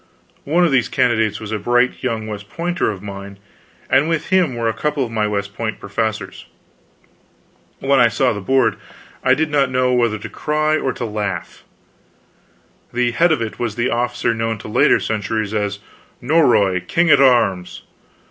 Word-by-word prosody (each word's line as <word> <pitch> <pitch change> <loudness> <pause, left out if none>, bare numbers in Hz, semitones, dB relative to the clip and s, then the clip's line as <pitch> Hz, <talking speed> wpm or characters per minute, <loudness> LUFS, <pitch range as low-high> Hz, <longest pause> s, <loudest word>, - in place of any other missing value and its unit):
One 170 +5 +3
of 165 - +1
these 130 -3 +2
candidates 115 -5 +1
was 110 -1 -7
a 110 - -2
bright 120 +4 +1
young 115 -4 -2
West 105 -1 -7
Pointer 175 +5 -1
of 100 -2 -6
mine, 100 0 -8 0.5
and 140 +4 +3
with 165 -2 -2
him 180 -9 +2
were 115 -1 -1
a 115 - +1
couple 150 -1 -1
of 115 - -9
my 110 -2 0
West 100 -1 -3
Point 110 -1 -4
professors. 100 -2 -4 1.3
When 135 0 +2
I 120 - +6
saw 125 +3 +1
the 100 - -6
Board, 110 0 +2 0.5
I - - +4
did 155 0 -1
not 140 -3 +2
know 125 0 +1
whether 120 -3 +1
to 100 - -8
cry 155 0 0
or 135 -4 -1
to 120 - -5
laugh. 105 -3 -4 1.3
The 120 0 0
head 170 +8 +3
of 130 -7 +1
it 110 - -7
was 115 -3 -2
the 120 +1 0
officer 120 0 0
known 115 0 -2
to - - -10
later 105 - +3
centuries 110 -1 -2
as 105 -1 -1 0.4
Norroy 120 - +3
King 175 -1 +2
at 145 - +6
Arms! 100 -9 +2
120 Hz, 175 wpm, -19 LUFS, 105-135 Hz, 1.3 s, I